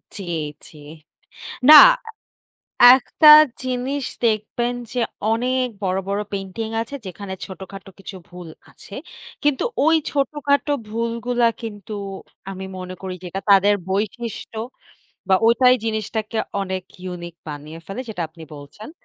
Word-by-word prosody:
জি, 200 Hz, -, -7 dB, 0.4 s
জি। 155 Hz, -, -16 dB, 0.9 s
না -, -, +12 dB, 1.2 s
একটা 265 Hz, +4 st, +3 dB, 0.4 s
জিনিস 255 Hz, +2 st, -3 dB, 0.2 s
দেখবেন 230 Hz, +2 st, 0 dB, 0.2 s
যে 250 Hz, -, -1 dB, 0.3 s
অনেক 250 Hz, +3 st, +1 dB, 0.2 s
বড়, 190 Hz, -1 st, -1 dB
বড় 200 Hz, +1 st, -1 dB
পেইন্টিং 195 Hz, +3 st, -5 dB
আছে 255 Hz, +5 st, -7 dB
যেখানে 190 Hz, +1 st, -7 dB
ছোটখাটো 195 Hz, 0 st, -10 dB
কিছু 195 Hz, 0 st, -9 dB
ভুল 180 Hz, -1 st, -11 dB, 0.2 s
আছে। 200 Hz, -, -16 dB, 0.5 s
কিন্তু 290 Hz, -3 st, +1 dB, 0.2 s
ওই 325 Hz, +1 st, +4 dB
ছোটখাটো 285 Hz, 0 st, 0 dB, 0.2 s
ভুলগুলা 235 Hz, +2 st, -1 dB, 0.2 s
কিন্তু 210 Hz, -2 st, -8 dB, 0.6 s
আমি 190 Hz, 0 st, -7 dB
মনে 185 Hz, 0 st, -7 dB
করি 190 Hz, -1 st, -5 dB
যে, -, -, -10 dB
এটা 195 Hz, +2 st, -5 dB
তাদের 200 Hz, +1 st, +5 dB
বৈশিষ্ট্য 220 Hz, +3 st, -4 dB, 0.7 s
বা 190 Hz, -, +5 dB
ওটাই 250 Hz, +2 st, +5 dB
জিনিসটাকে 220 Hz, 0 st, -3 dB, 0.2 s
অনেক 190 Hz, -1 st, -3 dB, 0.2 s
ইউনিক 175 Hz, -2 st, -7 dB
বানিয়ে 150 Hz, +2 st, -8 dB
ফেলে 195 Hz, +6 st, -6 dB
যেটা 180 Hz, -6 st, -4 dB
আপনি 160 Hz, +1 st, -15 dB
বলছেন। 145 Hz, -, -11 dB
210 Hz, 125 wpm, -21 LUFS, 190-245 Hz, 1.2 s, না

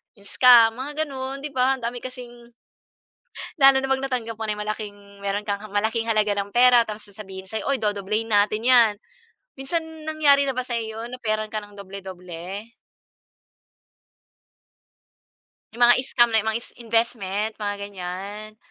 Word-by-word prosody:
yung 200 Hz, -2 st, -19 dB
scam. 235 Hz, -2 st, +6 dB
Mga 295 Hz, +3 st, -2 dB
gano’n, 270 Hz, 0 st, -6 dB
‘di 300 Hz, -, -5 dB
ba, 265 Hz, 0 st, +2 dB
ang 250 Hz, -, -14 dB
dami 240 Hz, +1 st, -3 dB
kasing 240 Hz, -2 st, -10 dB, 1.0 s
Lalo 270 Hz, -1 st, +7 dB
na 270 Hz, -, -3 dB
‘pag 270 Hz, 0 st, +1 dB
natanggap 245 Hz, -4 st, -3 dB
mo 220 Hz, -, -4 dB
na 210 Hz, -1 st, -2 dB
malaking 205 Hz, -1 st, -7 dB
meron 205 Hz, +1 st, -2 dB
kang 200 Hz, 0 st, -2 dB
malaking 220 Hz, +2 st, 0 dB
halaga 215 Hz, -2 st, +1 dB
ng 200 Hz, 0 st, -3 dB
pera 245 Hz, -1 st, +6 dB
tapos 215 Hz, -1 st, -7 dB
sasabihin 190 Hz, -2 st, -10 dB
sa'yo, 220 Hz, -, -4 dB
"Oy 270 Hz, -, 0 dB
dodoblehin 210 Hz, +2 st, -1 dB
natin 210 Hz, +1 st, +2 dB
yan." 235 Hz, -4 st, +6 dB, 0.6 s
Minsan 290 Hz, +5 st, -1 dB, 0.2 s
nangyari 290 Hz, -3 st, +4 dB
na 270 Hz, -, -1 dB
ba 255 Hz, -, -1 dB
sa'yo 225 Hz, -2 st, -4 dB
‘yon, 245 Hz, +2 st, -7 dB
offeran 215 Hz, -2 st, -2 dB
ka 215 Hz, -, -2 dB
ng 205 Hz, -1 st, -14 dB
doble-doble? 190 Hz, +1 st, -8 dB, 3.0 s
Yung 240 Hz, +1 st, +4 dB
mga 245 Hz, +1 st, +5 dB
scam 240 Hz, -3 st, +2 dB
na 220 Hz, -, +4 dB
mga 220 Hz, +1 st, -1 dB
is 235 Hz, -, -11 dB
investment, 220 Hz, -2 st, -1 dB
mga 205 Hz, 0 st, -2 dB
ganyan. 200 Hz, +2 st, -7 dB
220 Hz, 155 wpm, -24 LUFS, 205-250 Hz, 3.0 s, Lalo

